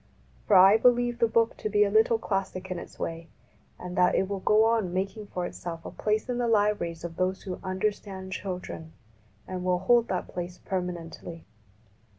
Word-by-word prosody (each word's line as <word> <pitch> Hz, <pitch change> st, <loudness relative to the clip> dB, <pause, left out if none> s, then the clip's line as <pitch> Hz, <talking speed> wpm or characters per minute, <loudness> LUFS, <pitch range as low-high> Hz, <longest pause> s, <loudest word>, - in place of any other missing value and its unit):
For -, -, +5 dB
I 195 Hz, +3 st, +8 dB
believe 240 Hz, 0 st, +3 dB
the 230 Hz, -, +4 dB
book 230 Hz, 0 st, +2 dB
to 215 Hz, -, -3 dB
be 210 Hz, 0 st, +4 dB
a 200 Hz, -, 0 dB
little 220 Hz, +2 st, +4 dB
classic 190 Hz, -3 st, -3 dB
in 180 Hz, -, -2 dB
its -, -, -11 dB
way, 165 Hz, 0 st, -5 dB, 0.5 s
and 180 Hz, 0 st, -7 dB
that 180 Hz, 0 st, +4 dB
it 190 Hz, -, +1 dB
will 200 Hz, 0 st, -3 dB
go 215 Hz, +3 st, +4 dB
on 225 Hz, -5 st, +1 dB
making 195 Hz, +3 st, -3 dB
for 180 Hz, -2 st, -3 dB
itself 165 Hz, -2 st, -7 dB
a -, -, -6 dB
place 215 Hz, +2 st, -1 dB
in 245 Hz, -1 st, -2 dB
the 240 Hz, -, +1 dB
libraries 205 Hz, -7 st, +1 dB
of 170 Hz, -1 st, -6 dB
those 185 Hz, +1 st, -1 dB
who 185 Hz, -3 st, -5 dB
understand 190 Hz, 0 st, -3 dB
children, 180 Hz, -4 st, -6 dB, 0.5 s
and 185 Hz, -1 st, -4 dB
will 180 Hz, 0 st, +2 dB
hold 235 Hz, +6 st, +3 dB
that 185 Hz, -4 st, -2 dB
place 175 Hz, 0 st, -6 dB
permanently. 175 Hz, -2 st, -5 dB
190 Hz, 185 wpm, -27 LUFS, 180-215 Hz, 0.5 s, I